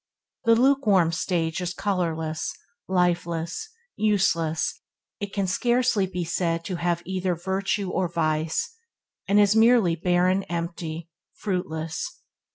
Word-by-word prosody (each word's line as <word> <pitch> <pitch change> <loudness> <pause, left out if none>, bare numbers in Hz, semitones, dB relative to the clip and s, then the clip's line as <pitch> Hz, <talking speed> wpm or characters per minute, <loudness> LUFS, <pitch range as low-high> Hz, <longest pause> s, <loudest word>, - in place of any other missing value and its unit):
The 230 0 +6
lukewarm 225 -9 +4
stage 165 +1 -1
is 180 0 -3
colourless, 165 -5 -1 0.4
lifeless, 175 - 0 0.3
useless; 185 -7 +1 0.4
it 205 -1 -4
can 200 -1 -1
scarcely 240 +1 +2
be 180 -1 -3
said 165 0 -1
to 185 -3 -3
have 175 0 -1
either 185 -1 -1
virtue 190 +2 -1
or 185 -1 0
vice, 160 - -1 0.5
and 200 +1 +4
is 205 0 +5
merely 225 -6 +5
barren 180 +3 +2
empty, 170 -1 -5 0.2
fruitless. 165 -5 -3
180 Hz, 115 wpm, -25 LUFS, 165-200 Hz, 0.5 s, The